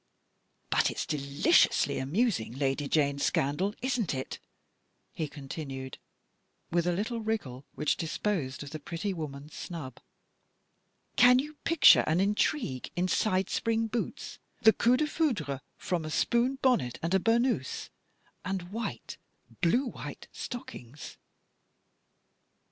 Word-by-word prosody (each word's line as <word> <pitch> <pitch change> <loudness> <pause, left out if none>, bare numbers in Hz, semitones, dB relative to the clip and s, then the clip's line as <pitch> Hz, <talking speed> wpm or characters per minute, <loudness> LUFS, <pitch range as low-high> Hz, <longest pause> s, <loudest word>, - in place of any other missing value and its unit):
" - - -45
But - - +3
it's - - -3
deliciously 140 -1 +3
amusing, 150 - 0
Lady 135 +1 -1
Jane's 140 -2 +2
scandal, 175 +9 +1
isn't 245 - 0
it? 130 - -5 0.4
" - - -47 0.3
he 155 - -2
continued, 135 -2 -7 0.7
with 175 0 +1
a - - +3
little 220 +6 -2
wriggle 195 - -3
which 150 +1 +1
disposed 160 -5 -2
of 145 - -9
the 155 - -5
pretty 170 +6 -3
woman's 150 -3 -7
snub. 150 -8 -7 0.6
" - - -46
Can 250 0 +8
you 295 +4 -2
picture 330 -2 +7
an 160 +3 +2
intrigue 200 - 0
in 180 +1 +1
side 185 0 +1
spring 225 0 +1
boots, 225 +1 -4 0.2
the 220 0 +8
coup 245 +2 +3
defoucbre 255 - 0 0.2
from 175 -3 -2
a 155 - -5
spoon 240 - +1
bonnet 240 - +2
and 170 +2 0
a 190 - +5
burnous, 230 - 0 0.5
and 185 -1 -4
white, 210 - -5 0.4
blue 240 +11 +3
white 245 - -7
stockings 145 - -8
175 Hz, 130 wpm, -29 LUFS, 140-230 Hz, 0.7 s, Can